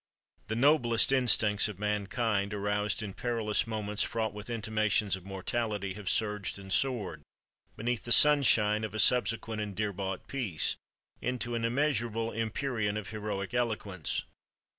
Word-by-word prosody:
The 110 - -3
noblest 120 -3 +4
instincts 110 -6 +5
of 105 -4 -7
mankind—aroused 105 0 -1
in 100 -2 -6
perilous 115 -2 -1
moments 105 -2 -3
fraught 110 -2 -1
with 105 +2 -9
intimations 110 -3 0
of 95 -1 -12
mortality—have 100 0 -3
surged 105 -3 0
and 95 -1 -5
soared, 120 - 0 0.6
beneath 120 +1 -2
the 120 - -4
sunshine 115 -8 +6
of 110 -1 -5
a - - -2
subsequent 115 -1 +2
and 105 -2 -5
dear 105 0 -2
bought 95 0 -5
peace, 110 - -1 0.5
into 125 -1 -3
an 115 -1 -2
immeasurable 115 -3 0
empyrean 115 -1 -2
of 105 - -6
heroic 105 -2 -4
eloquence. 105 - -2
110 Hz, 135 wpm, -30 LUFS, 105-120 Hz, 0.6 s, sunshine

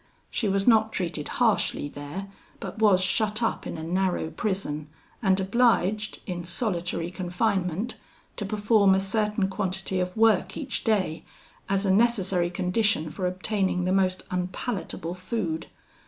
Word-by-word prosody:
She 215 - 0
was 195 0 +1
not 220 -2 +5
treated 170 -7 -3
harshly 220 -10 +1
there, 145 +7 -7 0.3
but - - -7
was 205 -4 +5
shut 215 +3 +2
up 225 - -1
in - - -5
a 160 - -6
narrow 180 -1 0
prison, 170 -8 -2 0.3
and 190 -3 +3
obliged, 215 0 +2
in 175 -2 -4
solitary 175 -2 -2
confinement, 185 +2 -1 0.4
to - - -2
perform 205 -1 +4
a - - +3
certain 210 0 0
quantity 190 -1 -2
of 180 +3 -2
work 220 -4 +3
each 270 -4 -3
day, 195 -8 +1 0.5
as 195 +1 +1
a 190 - +3
necessary 195 -5 +2
condition 180 -2 0
for 185 +2 -2
obtaining 185 0 -1
the 185 - +1
most 185 -1 +2
unpalatable 180 -1 -3
food. 185 -3 -3
190 Hz, 140 wpm, -26 LUFS, 180-215 Hz, 0.5 s, not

